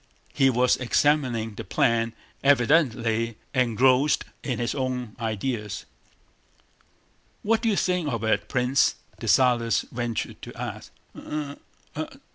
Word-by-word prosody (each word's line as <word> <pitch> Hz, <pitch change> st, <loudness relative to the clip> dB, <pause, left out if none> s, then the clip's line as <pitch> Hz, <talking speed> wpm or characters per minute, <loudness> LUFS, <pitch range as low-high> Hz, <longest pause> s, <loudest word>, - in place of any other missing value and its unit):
He 135 Hz, -2 st, +4 dB
was 125 Hz, 0 st, +3 dB
examining 125 Hz, -4 st, +1 dB
the -, -, -7 dB
plan, 115 Hz, +3 st, +1 dB, 0.3 s
evidently 120 Hz, -5 st, +2 dB, 0.2 s
engrossed 130 Hz, +3 st, +3 dB, 0.2 s
in 125 Hz, -4 st, -2 dB
his 120 Hz, 0 st, -1 dB
own 125 Hz, -4 st, -3 dB
ideas. 110 Hz, -2 st, -3 dB, 1.6 s
"What 225 Hz, +1 st, +2 dB
do 230 Hz, -, +1 dB
you 210 Hz, -, +2 dB
think 180 Hz, -5 st, 0 dB
of 115 Hz, -2 st, -3 dB
it, 110 Hz, -, 0 dB
Prince?" 125 Hz, +1 st, +2 dB, 0.2 s
Dessalles 120 Hz, -3 st, +3 dB
ventured 120 Hz, -1 st, -3 dB
to -, -, -9 dB
ask. -, -, -6 dB, 0.2 s
"I? 150 Hz, -2 st, -5 dB, 0.4 s
I?..." -, -, -3 dB
125 Hz, 115 wpm, -25 LUFS, 115-140 Hz, 1.6 s, He